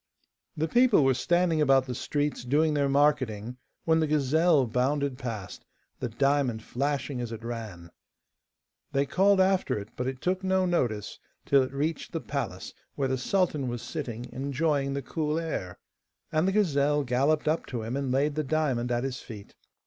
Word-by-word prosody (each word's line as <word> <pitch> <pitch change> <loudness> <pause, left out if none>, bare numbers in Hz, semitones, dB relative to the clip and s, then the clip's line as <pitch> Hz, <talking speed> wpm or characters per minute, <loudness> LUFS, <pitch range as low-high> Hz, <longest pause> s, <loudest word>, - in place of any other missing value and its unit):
The 160 +1 0
people 240 - +4
were 135 - +4
standing 175 +3 +1
about 135 -2 +4
the 125 - -4
streets 145 +2 -2
doing 150 +5 +2
their 140 -1 +1
marketing, 125 -5 +1 0.3
when 160 0 +3
the 160 - +1
gazelle 150 +1 +3
bounded 130 +3 0
past, 110 -8 -6 0.4
the 125 - -3
diamond 135 -2 +1
flashing 140 0 -2
as 120 -1 -4
it 115 0 -7
ran. 110 -8 -7 1.0
They 140 0 +2
called 195 +7 +3
after 190 - +2
it, 105 +1 -7
but 125 - -3
it 130 -1 -4
took 185 +5 -1
no 190 0 +2
notice 120 - -1 0.3
till 140 -1 +5
it 130 - -2
reached 150 +4 -3
the 165 - -1
palace, 110 -13 -4 0.2
where 135 -2 0
the 130 - +1
sultan 155 -4 0
was 120 -1 -4
sitting, 125 -7 -5
enjoying 140 +1 0
the 140 - -3
cool 155 +2 -2
air. 155 - -4 0.5
And 160 +2 +2
the - - +2
gazelle 150 -7 +2
galloped 140 +5 +1
up 160 +2 0
to 120 -4 -4
him, 115 +3 -3
and 140 -2 -2
laid 140 +3 +1
the 155 +1 -1
diamond 130 -5 0
at 120 0 0
his 130 -1 -3
feet. 105 -4 -10
140 Hz, 175 wpm, -28 LUFS, 125-155 Hz, 1.0 s, till